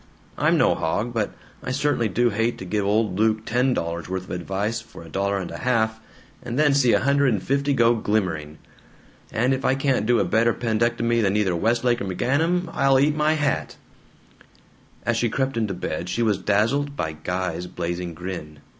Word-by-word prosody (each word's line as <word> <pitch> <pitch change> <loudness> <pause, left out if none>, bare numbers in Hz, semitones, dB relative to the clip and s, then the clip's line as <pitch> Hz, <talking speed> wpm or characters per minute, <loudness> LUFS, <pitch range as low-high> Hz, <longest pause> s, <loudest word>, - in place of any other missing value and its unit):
I'm - - +2
no - - +4
hog, 105 +9 -2
but 110 -3 -1 0.3
I - - -5
certainly 130 -4 0
do 120 +5 +2
hate 115 +3 0
to 95 - -7
give 105 +3 -1
old 105 -2 +1
Luke 110 0 +2
ten 125 +3 +1
dollars' 85 +1 -3
worth 95 0 -3
of - - -11
advice 95 +5 -2
for - - -13
a 80 - -12
dollar 100 +3 0
and 95 -3 -5
a - - -7
half, 110 -3 +1 0.4
and 120 - -5
then 150 -1 +4
see 130 -4 +4
a - - +4
hundred 140 0 +3
and 100 - -2
fifty 140 +1 0
go 120 -3 +4
glimmering. 90 -9 -1 0.7
And 125 +4 +1
if 130 +1 -3
I 130 - +3
can't 135 -4 0
do 120 -1 +4
a - - +2
better 115 +1 +2
'pendectomy 115 0 +1
than 100 -1 +1
either 95 -4 +1
Westlake 120 +5 +1
or - - -2
McGanum, 160 - 0
I'll 135 -1 +3
eat 145 +2 +3
my 150 +1 +2
hat!" 150 -3 -1 1.3
As 120 -1 +1
she 120 0 +1
crept 135 +2 -1
into 110 -4 -1
bed 85 0 -4
she 115 +6 0
was 105 -4 +1
dazzled 115 +9 +1
by 80 - -2
Guy's 90 +2 -3
blazing 85 0 -4
grin. 85 -4 -7
110 Hz, 195 wpm, -23 LUFS, 95-130 Hz, 1.3 s, no